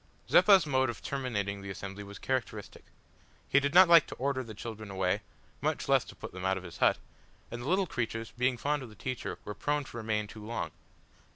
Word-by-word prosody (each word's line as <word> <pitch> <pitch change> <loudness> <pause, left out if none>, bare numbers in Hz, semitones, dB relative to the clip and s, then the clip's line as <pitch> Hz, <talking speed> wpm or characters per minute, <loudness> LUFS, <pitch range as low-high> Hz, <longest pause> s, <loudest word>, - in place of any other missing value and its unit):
Zeppa's 195 -5 +7
mode 130 -3 +2
of 120 - -6
terminating 105 -8 -2
the 100 - -7
assembly 100 +1 -6
was 100 0 -10
characteristic. 130 -6 -4 0.6
He 140 - +5
did 140 +3 -1
not 185 0 +10
like 170 -3 +7
to - - -7
order 135 0 -1
the 110 -3 -9
children 110 -1 -7
away, 95 -2 0 0.4
much - - -1
less - - +4
to - - -12
put - - -8
them 95 0 -8
out 95 0 +1
of 95 - -7
his 90 -2 -10
hut, - - +4 0.5
and 120 +1 -5
the 125 - -4
little 190 +2 +3
creatures, 115 -6 -3
being 125 +1 +1
fond 145 +3 0
of 130 - -8
the 105 - -14
teacher, 130 +3 -4
were 105 - -4
prone 145 +6 -1
to 125 - -10
remain 110 -2 -1
too 105 0 -11
long. 115 +2 -3
120 Hz, 215 wpm, -31 LUFS, 105-140 Hz, 0.6 s, not